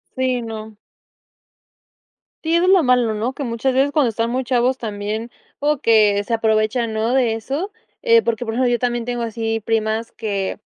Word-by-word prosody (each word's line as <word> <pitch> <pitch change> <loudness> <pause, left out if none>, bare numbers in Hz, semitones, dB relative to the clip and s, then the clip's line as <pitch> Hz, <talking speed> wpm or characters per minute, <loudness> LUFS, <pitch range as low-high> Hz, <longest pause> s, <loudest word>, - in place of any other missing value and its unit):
Sí, 255 -1 0
no. 220 -1 -7 1.7
Sí, 325 +1 0
eso 340 +1 +3
es - - +3
lo 380 -3 +5
malo, 250 -4 +2
¿no? 230 +5 -2
Que 280 - -5
muchas 240 +1 -1
veces 270 +2 +2
cuando 285 -5 +2
están 230 +1 -1
muy 255 +2 -1
chavos 250 +1 +1
también 215 +1 -4 0.3
o 295 0 0
que 210 -3 +4
se 230 - -4
aprovechan, 220 +1 +1
¿no? 220 +3 0
De 250 -4 +2
eso. 275 - -4 0.3
Eh, 460 -1 +5
porque 235 - -2
por 225 - -3
eso 250 +2 +1
yo 240 0 +2
también 240 -1 -1
tengo 240 -1 -2
así 225 0 -2
primas 220 +1 -1
que 200 -4 -3
235 Hz, 185 wpm, -20 LUFS, 220-260 Hz, 1.7 s, lo